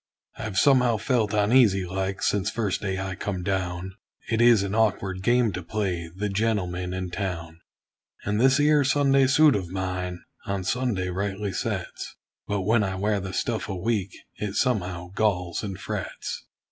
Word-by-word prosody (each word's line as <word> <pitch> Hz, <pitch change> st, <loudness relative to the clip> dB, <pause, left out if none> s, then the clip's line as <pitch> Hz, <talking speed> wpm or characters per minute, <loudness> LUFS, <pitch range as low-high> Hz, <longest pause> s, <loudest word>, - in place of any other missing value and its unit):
I've 105 Hz, -3 st, -5 dB
somehow 125 Hz, +1 st, +4 dB
felt 110 Hz, -2 st, +1 dB
uneasy 105 Hz, -2 st, +4 dB
like, 95 Hz, +2 st, -3 dB
since 100 Hz, 0 st, +1 dB
first 105 Hz, -5 st, -1 dB
day 95 Hz, -2 st, -2 dB
I 95 Hz, 0 st, -3 dB
come 95 Hz, 0 st, -4 dB
down; 95 Hz, -1 st, -2 dB, 0.4 s
It 115 Hz, 0 st, +2 dB
is 120 Hz, -4 st, +6 dB
an 100 Hz, 0 st, -3 dB
awkward 100 Hz, -4 st, +1 dB
game 120 Hz, +2 st, +3 dB
to 90 Hz, 0 st, -4 dB
play 90 Hz, -3 st, -2 dB
the 105 Hz, +2 st, -2 dB
gentleman 95 Hz, -4 st, -1 dB
in 90 Hz, -1 st, -4 dB
town; 85 Hz, -4 st, -4 dB, 0.7 s
And 105 Hz, +2 st, 0 dB
this 130 Hz, +2 st, +5 dB
'ere 150 Hz, 0 st, +4 dB
Sunday 135 Hz, -1 st, +3 dB
suit 150 Hz, +2 st, +5 dB
of 95 Hz, -4 st, -3 dB
mine 90 Hz, -1 st, -3 dB, 0.2 s
on 100 Hz, -1 st, -2 dB
Sunday 105 Hz, -3 st, -1 dB
rightly 100 Hz, +2 st, -2 dB
sets; -, -, -4 dB, 0.3 s
But 100 Hz, -1 st, -1 dB
when 110 Hz, +4 st, +3 dB
I 95 Hz, -1 st, -2 dB
wear 100 Hz, +2 st, 0 dB
the 95 Hz, -1 st, -5 dB
stuff 110 Hz, +3 st, -2 dB
a 95 Hz, -, -2 dB
week, 100 Hz, -1 st, -1 dB, 0.2 s
it 105 Hz, -1 st, -4 dB
somehow 90 Hz, -8 st, -1 dB
galls 90 Hz, -5 st, 0 dB
and 95 Hz, -3 st, -5 dB
frets. -, -, -5 dB
100 Hz, 165 wpm, -26 LUFS, 95-110 Hz, 0.7 s, is